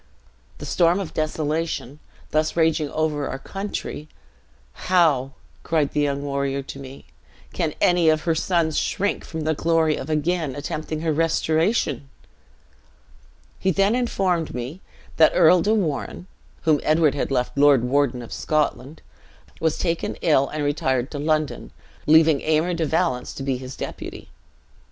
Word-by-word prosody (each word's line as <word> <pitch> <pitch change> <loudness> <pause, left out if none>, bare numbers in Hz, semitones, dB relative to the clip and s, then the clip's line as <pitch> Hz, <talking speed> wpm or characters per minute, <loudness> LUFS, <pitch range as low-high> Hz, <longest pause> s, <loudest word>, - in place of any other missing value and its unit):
'The - - -8
storm 175 +1 +2
of 190 -5 -5
desolation, 155 -2 -2 0.3
thus 155 0 +1
raging 160 -2 +2
over 150 -2 -1
our 135 - -4
country; 195 -2 -6 0.8
how,' 150 -8 +3 0.3
cried 155 -3 0
the 150 - 0
young 140 -1 -1
warrior 140 -1 -2
to 135 - -9
me, 135 0 -11 0.5
'can - - -2
any 175 -2 +4
of 155 0 +2
her 165 - +1
sons 160 -1 +1
shrink 200 +1 -1
from 160 -1 -6
the 155 +1 0
glory 160 0 +2
of 135 - -6
again 155 -2 -1
attempting 155 +2 -4
her 160 -1 0
restoration?' 160 - 0 1.5
He 190 - +1
then 195 +4 +2
informed 190 - 0
me 130 +9 -6 0.4
that 160 -1 +6
Earl 175 +2 +6
de 215 +4 +2
Warenne 175 -3 -2 0.4
(whom 155 -3 +3
Edward 155 -1 +3
had 145 - -2
left 125 -2 -1
lord 140 -3 +5
warden 125 -1 +1
of 115 - -9
Scotland), 150 -1 -2 0.6
was 160 -1 0
taken 170 -2 -2
ill, 140 -4 +3
and 150 -1 -3
retired 130 -3 0
to 145 - -5
London, 155 0 -1 0.4
leaving 160 -1 +5
Aymer 160 +3 +1
de 165 -2 -1
Valence 125 -6 -1
to 135 - -6
be 135 -2 -1
his 130 +1 -8
deputy. - - -7
155 Hz, 145 wpm, -23 LUFS, 140-165 Hz, 1.5 s, that